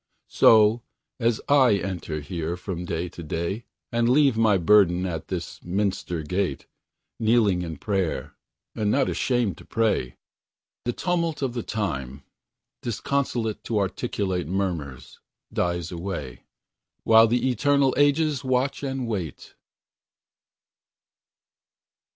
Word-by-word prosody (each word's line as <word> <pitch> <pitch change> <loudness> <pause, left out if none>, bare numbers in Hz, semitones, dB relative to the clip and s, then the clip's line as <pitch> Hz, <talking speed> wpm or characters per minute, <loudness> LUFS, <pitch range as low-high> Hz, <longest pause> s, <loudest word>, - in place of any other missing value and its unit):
So, 110 +1 +6 0.4
as 115 -2 +1
I 130 -6 +5
enter 90 -5 -4
here 85 +3 -4
from 90 -1 -5
day 85 +1 -2
to 85 - -10
day, 85 +7 -3 0.3
And 115 0 +2
leave 135 -1 +4
my 110 -3 +4
burden 90 -1 +4
at 80 -4 -4
this - - -5
minster 90 -3 -2
gate, 90 -3 -2 0.5
Kneeling 110 -5 +3
in 80 -2 -5
prayer, 95 -6 -2 0.4
and 105 -2 -1
not 135 +4 +2
ashamed 120 -9 0
to - - -12
pray, 105 - 0 0.7
The 120 - 0
tumult 170 -3 -1
of 130 -3 -1
the 120 - -2
time 70 - -4 0.6
disconsolate 120 -2 -2
To 115 - -2
inarticulate 95 -3 -1
murmurs 85 -9 -4 0.3
dies 85 -1 -1
away, 85 -7 -6 0.6
While 115 0 +7
the 125 +3 +1
eternal 140 +2 +2
ages 145 0 +2
watch 130 +1 0
and 135 -3 -3
wait. 95 -10 -5
105 Hz, 115 wpm, -25 LUFS, 85-120 Hz, 0.7 s, While